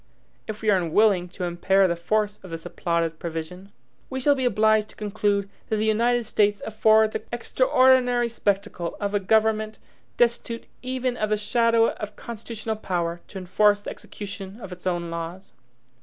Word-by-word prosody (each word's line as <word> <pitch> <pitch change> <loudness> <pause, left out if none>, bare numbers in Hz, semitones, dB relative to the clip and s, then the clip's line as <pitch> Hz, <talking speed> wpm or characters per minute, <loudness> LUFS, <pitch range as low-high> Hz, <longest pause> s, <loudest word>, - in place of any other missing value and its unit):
If 215 0 -6
we 215 - +4
are 195 - +4
unwilling 180 +1 +2
to 185 +1 -7
impair 185 +2 +3
the 170 - 0
force 210 +4 -1
of 185 - -11
this 165 0 -7
applauded 165 -2 -1
provision, 170 +4 -6 0.4
we 265 - -3
shall 285 +3 +4
be 260 -2 -1
obliged 215 -2 +3
to - - -15
conclude, 205 -1 0 0.2
that 220 - +1
the 215 0 0
United 235 +2 +2
States 205 -1 +2
afford 220 0 +4
the - - -3
extraordinary 255 - +3
spectacle 200 -6 -2
of 205 0 -2
a 205 - +2
government 215 +2 +1 0.4
destitute 235 -1 0 0.2
even 255 -1 -2
of 215 -2 -1
the 215 - +2
shadow 230 +2 +3
of 210 - -7
constitutional 225 -1 -5
power 175 -4 -2
to 195 - -9
enforce 205 +3 +2
the - - -5
execution 200 0 -8
of 195 -5 -9
its 180 0 -7
own 175 -2 -1
laws. 170 +3 -6
210 Hz, 170 wpm, -25 LUFS, 185-225 Hz, 0.4 s, we